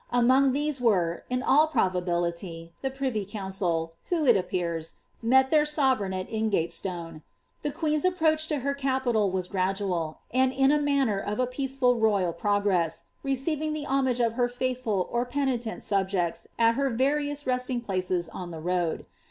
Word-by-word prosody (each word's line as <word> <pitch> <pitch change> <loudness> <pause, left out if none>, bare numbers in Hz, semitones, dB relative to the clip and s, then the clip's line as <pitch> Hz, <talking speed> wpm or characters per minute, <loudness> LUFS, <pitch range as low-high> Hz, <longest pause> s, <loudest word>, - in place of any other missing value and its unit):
Among 255 +3 +4
ihese 295 -2 -1
were, 180 -8 +1
in 250 +1 -1
all 300 +4 +5
probability, 175 - -1
the 270 - -1
privy 265 -5 -2
council. 190 -5 -2 0.2
w:;o, 335 -4 +1
it 240 - +7
appears, 170 -3 -2 0.3
met 265 +3 +4
their 305 -1 +5
sovereign 265 -10 +1
at 185 0 -3
Ingatestone. 170 -6 -2 0.4
The 295 - -2
queen's 305 0 -1
approach 315 -4 +2
to 300 -4 -1
her 280 - +1
capital 260 -6 +1
was 185 -1 -2
gradual, 185 -4 -1 0.2
and 260 0 +3
in 270 +1 +4
the 300 - +3
manner 275 -8 +1
of 205 +2 -3
a 255 - +3
peaceful 255 -1 0
royal* 200 -6 +2
progress, 195 -3 0 0.2
receiving 300 +3 -1
the 305 -1 -4
homage 265 -3 +1
of 230 -2 +2
her 245 0 +1
faithful 245 -6 -1
or 240 0 +1
penitent 245 -3 -2
subjects 190 -4 -1
at 230 0 +4
her 275 +3 0
\*arioDS 285 +4 0
resting 250 -1 -1
places 185 -5 -1
on 175 +2 -7
the 165 -2 -7
ro 175 0 0
id. - - -21
235 Hz, 160 wpm, -27 LUFS, 185-270 Hz, 0.4 s, it